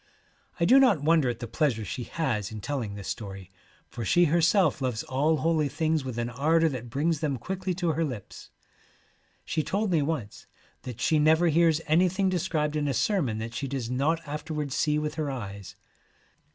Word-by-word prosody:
I 170 - +3
do 260 +8 +7
not 220 - +4
wonder 155 -4 +3
at 120 0 -5
the 120 - -4
pleasure 115 -3 0
she 125 +3 -5
has 115 -11 -2
in 110 - -6
telling 115 -3 -4
this 100 -2 -8
story, 95 -3 -6 0.4
for 120 - -7
she 175 - +4
herself 165 -1 +3
loves 125 -4 -1
all 150 +5 +1
holy 155 -1 +1
things 155 0 0
with 130 -3 -5
an 120 0 -2
ardour 160 +6 +2
that 125 -4 -6
brings 150 +5 0
them 145 -4 -1
quickly 185 +7 -3
to 175 -1 -1
her 160 +2 0
lips. 125 -10 -7 1.0
She 160 - -1
told 200 +5 -1
me 165 -3 +3
once 140 -9 -4 0.3
that 125 -3 -8
she 155 +3 +3
never 160 +3 +4
hears 165 0 +3
anything 185 +4 +2
de 185 -1 0
scribed 155 -4 -1
in 150 -1 0
a 135 - -1
sermon 140 - 0
that 115 +1 -5
she 135 - -3
does 130 -3 -4
not 155 +5 0
afterwards 150 -1 -4
see 150 -1 +1
with 150 0 -2
her 150 - -2
eyes. 100 -7 -7
150 Hz, 190 wpm, -27 LUFS, 120-165 Hz, 1.0 s, do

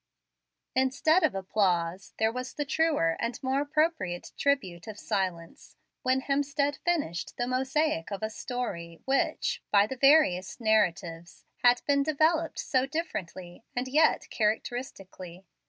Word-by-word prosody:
Instead 280 +7 +3
of - - +1
applause, 185 -2 -1
there 220 0 +2
was 255 +2 -6
the 295 - -2
truer 290 - +1
and 230 +1 -2
more 265 +2 +1
appropriate 290 - -1
tribute 210 -12 -1
of 215 -1 -7
silence 185 -6 -4 0.3
when 260 +1 +1
Hemstead 285 +1 0
finished 310 - -2
the 240 - 0
mosaic 260 - 0
of 200 +1 -5
a 215 - 0
story 180 -11 -5
which, 270 +1 0
by 200 -1 +5
the 260 +5 -6
various 265 - +4
narratives, 180 -6 0
had 245 0 +4
been 280 -1 +3
developed 315 +2 +1
so 260 0 0
differently 190 - -5
and 250 +1 -1
yet 305 +4 +3
characteristically. 195 -5 -3
245 Hz, 130 wpm, -28 LUFS, 185-280 Hz, 0.3 s, by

